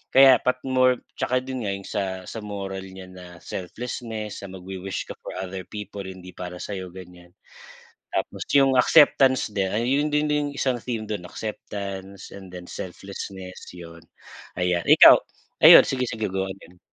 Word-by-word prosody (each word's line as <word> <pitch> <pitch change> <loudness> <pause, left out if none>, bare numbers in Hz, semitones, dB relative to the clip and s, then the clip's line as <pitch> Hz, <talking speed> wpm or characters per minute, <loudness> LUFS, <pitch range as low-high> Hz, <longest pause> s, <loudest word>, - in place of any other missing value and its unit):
kaya 135 -1 +8
pat 125 0 +1
more 130 -1 +2 0.2
tsaka 125 +1 0
din 130 -5 -4
nga, 100 - -1
yung 100 0 -10
sa 95 -2 -3
sa 115 - -7
moral 100 -2 -5
niya 95 -1 -11
na 90 -1 -11 0.2
selflessness, 110 +2 -6
na 100 - -7
magwi-wish 95 +1 -5
ka - - -4
for - - -8
other 95 0 -5
people, 105 -1 -7
hindi 95 -1 -9
para 90 0 -7
sa'yo, 95 -1 -6
ganiyan. 90 -1 -13 0.9
Tapos - - -2
yung 135 -1 +5
acceptance 135 -4 +5
din 95 -2 0
ay 105 +4 -1
yun, 140 +4 +2
yun 150 0 +1
din 150 - +2
yung - - -9
isang 130 -3 0
theme 115 -3 -4
dun 100 -4 -5
acceptance 100 -2 -7
and 95 -2 -11
then 90 - -8
selflessness, 95 +1 -8
yun. 85 -1 -11 0.6
Ayan. 90 -1 +1
Ikaw, - - +10 0.5
ayun, - - +10
sige, 130 -2 -1
sige, 110 -2 -3
go 95 0 -1
ahead. 90 -2 -12
100 Hz, 165 wpm, -24 LUFS, 95-125 Hz, 0.9 s, Ikaw